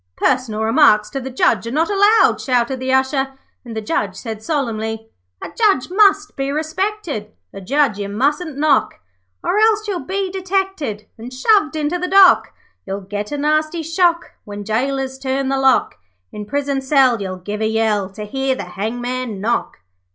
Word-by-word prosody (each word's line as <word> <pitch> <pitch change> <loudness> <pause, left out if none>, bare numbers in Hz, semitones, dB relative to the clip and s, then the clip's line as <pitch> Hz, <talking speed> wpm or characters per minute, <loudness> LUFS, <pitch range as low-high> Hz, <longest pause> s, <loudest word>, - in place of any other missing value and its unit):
'Personal 245 -4 0
remarks 215 -3 +4
to 270 - -3
the 265 - -6
Judge 250 -2 +1
are - - -4
not 315 +5 +1
allowed,' 410 +3 +4
shouted 250 0 0
the 260 0 -2
Usher, 270 +1 +1 0.3
and 235 -3 -9
the - - -2
Judge 205 -2 -2
said 220 +1 -7
solemnly 225 -5 -3 0.3
'A - - -5
Judge 400 - +2
must 400 +1 +3
be 275 0 -2
respected, 315 - -3 0.2
A 195 - -8
Judge 270 0 +1
you 200 -1 -4
mustn't 285 - -1
knock, 295 -2 +2 0.5
Or 415 - +1
else 435 -1 +3
you'll 390 -4 -2
be 380 +1 -3
detected 375 - -2
And 240 +3 -8
shoved 310 +5 +2
into 310 +3 -1
the 360 - -2
dock. 380 -1 +6 0.3
You'll 195 +1 -5
get 205 +3 -5
a 290 - -2
nasty 310 +3 0
shock 340 +1 +1
When 205 0 -7
gaolers 265 +5 -2
turn 265 0 -1
the 270 0 0
lock. 265 - +2 0.3
In 210 -1 -7
prison 280 +2 -1
cell 265 -4 +3
you'll 185 -1 -4
give 205 +4 -6
a 220 - +1
yell 220 -3 0
To 210 +2 -8
hear 265 +4 -1
the - - -5
hangman 235 +4 -4
knock.' 230 - -2
265 Hz, 175 wpm, -19 LUFS, 220-315 Hz, 0.5 s, dock